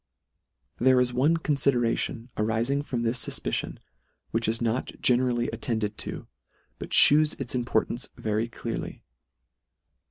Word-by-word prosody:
There 130 +1 +4
is 125 -1 +1
one 145 +7 +2
confideration 125 -5 0
arifing 115 +6 0
from 120 -5 -3
this 120 +1 +1
fufpicion, - - -3 0.5
which 115 0 0
is 115 +1 +1
not 115 +2 -2
generally 120 -1 +2
attended 110 -2 -3
to, - - -5 0.5
but - - -7
fhews 150 +1 +5
its 130 -3 -5
importance 120 -1 -1
very 110 +1 -1
clearly. - - -6
120 Hz, 120 wpm, -26 LUFS, 115-130 Hz, 0.5 s, fhews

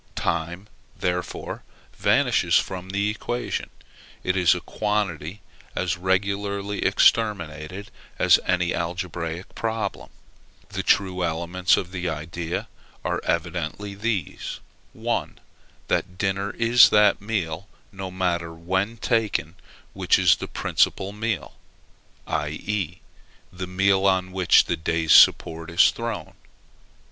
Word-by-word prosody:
Time, 85 +4 -2 0.3
therefore, 90 0 -3 0.3
vanishes - - +2
from 95 0 -3
the 100 +2 0
equation: 120 +3 -3 0.5
it 90 - 0
is 90 -4 +4
a - - -3
quantity 100 -4 -2 0.3
as 90 -1 0
regularly 100 +2 -1
exterminated 95 -3 +1 0.3
as - - +5
in - - -16
any 90 -1 +1
algebraic 85 0 -4
problem. 110 -1 -3 0.6
The - - -3
true 95 -2 +2
elements 85 +2 +1
of 90 - -4
the 90 -2 -3
idea, 80 +2 -4 0.4
are - - -1
evidently 85 +4 -2
these: 100 -4 -3 0.3
1. - - -3 0.5
That 90 -1 -1
dinner 100 +1 -1
is 120 +1 +6
that 105 -2 +4
meal, 100 -4 -3 0.2
no 95 -2 -6
matter 85 -3 -2
when 95 +7 -1
taken, 110 - 0 0.4
which - - +3
is - - +5
the - - -6
principal 95 +1 0
meal; 105 -6 -3 0.7
i.e. 80 +4 -3 0.5
the 90 0 -5
meal 95 +1 +2
on 95 -1 +1
which 95 -1 +5
the - - 0
day's 80 -1 +1
support 80 0 +5
is 85 - +5
thrown. - - -5
95 Hz, 115 wpm, -24 LUFS, 85-100 Hz, 0.7 s, is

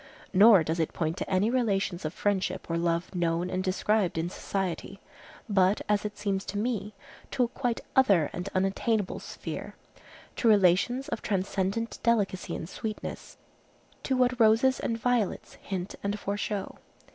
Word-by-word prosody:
Nor 200 -2 +8
does 160 +2 -2
it 160 - 0
point 160 -1 -1
to - - -4
any 195 +4 +2
relations 200 -8 0
of 155 - -1
friendship 200 -2 -1
or - - +1
love 170 +1 -1
known 175 0 0
and 185 0 -1
described 190 0 +1
in 165 +2 -1
society, 195 0 -3 0.5
but, 195 -1 +3
as 210 0 +1
it 210 0 -5
seems 195 -2 -1
to 205 - -4
me, 210 -2 -2 0.3
to 260 - +1
a - - +2
quite 240 -1 -2
other 200 - +5
and 180 +3 -4
unattainable 195 +2 0
sphere, - - -7 0.6
to 235 - +1
relations 210 +6 +4
of - - -3
transcendent 195 +3 -1
delicacy 205 -6 0
and - - -5
sweetness, 215 +3 -6 0.6
to 265 - 0
what 250 0 +2
roses 230 +4 +4
and 230 - -1
violets 235 -3 -1
hint 190 -1 -4
and 200 +1 -2
foreshow. 200 0 -3
200 Hz, 155 wpm, -28 LUFS, 185-225 Hz, 0.6 s, Nor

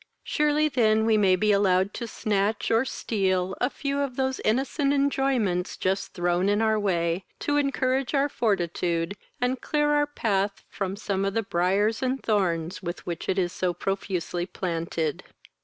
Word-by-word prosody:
Surely 300 0 +2
then 220 -5 +3
we 225 -1 +4
may 195 -3 +4
be 210 +3 +2
allowed 195 -1 +3
to 235 - -5
snatch, 210 -1 -1
or 225 +2 +4
steal, 190 -7 -1
a 250 - +3
few 280 0 -3
of 275 -3 -2
those 265 0 -1
innocent 270 +5 +1
enjoyments 270 -10 +1
just 190 +1 -1
thrown 175 +2 +1
in 205 +1 +2
our 220 -1 +2
way, 175 -3 0
to 290 - -1
encourage 270 -1 0
our 280 +1 +3
fortitude, 175 - -1 0.2
and 250 +1 0
clear 295 -1 +1
our 295 0 +3
path 200 -8 -1
from 195 -1 -3
some 200 -2 -2
of 195 +1 -1
the 225 - +1
briars 195 +4 +1
and 260 +1 -1
thorns 180 -6 0
with 175 -1 -6
which 170 -1 -5
it 190 - +1
is 180 -2 0
so 180 -2 -1
profusely 180 -2 -2
planted. 165 -4 -3
205 Hz, 165 wpm, -26 LUFS, 185-255 Hz, 0.2 s, we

